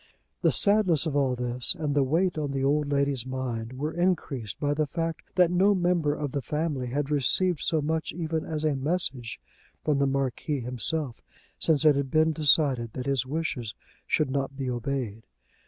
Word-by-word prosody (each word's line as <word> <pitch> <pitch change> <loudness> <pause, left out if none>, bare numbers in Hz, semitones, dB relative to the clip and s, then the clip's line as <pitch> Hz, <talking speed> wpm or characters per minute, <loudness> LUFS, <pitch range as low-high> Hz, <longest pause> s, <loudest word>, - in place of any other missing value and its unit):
The - - +3
sadness 200 -7 +5
of 155 -3 -2
all 135 -3 +1
this 125 +5 +2
and 150 -3 -2
the 145 - +3
weight 165 +7 +1
on 145 -3 -3
the 135 -1 -2
old 145 +1 +1
lady's 140 -3 0
mind 125 -3 -4
were 150 +4 -4
increased 160 - -2
by 145 -1 0
the 150 0 -1
fact 165 +2 -3
that 180 -2 +4
no 195 +3 +3
member 175 -5 +1
of 145 -3 -4
the 140 - -2
family 150 -3 -2
had 140 +3 -2
received 150 +5 +2
so 155 -3 0
much 160 +1 -2
even 160 -2 -3
as 155 -1 -3
a 150 -2 +1
message 135 -5 -2 0.4
from 150 -2 +1
the 140 - +2
Marquis 135 +1 -2
himself 125 +2 -2 0.4
since 155 -2 +4
it 150 -2 +6
had 140 -1 -2
been 155 +2 +2
decided 140 -6 +3
that 125 - -5
his 135 -2 0
wishes 135 -7 -3 0.3
should 150 -4 +1
not 135 0 -3
be 130 -2 -3
obeyed. 120 -3 -3
145 Hz, 185 wpm, -26 LUFS, 130-160 Hz, 0.4 s, it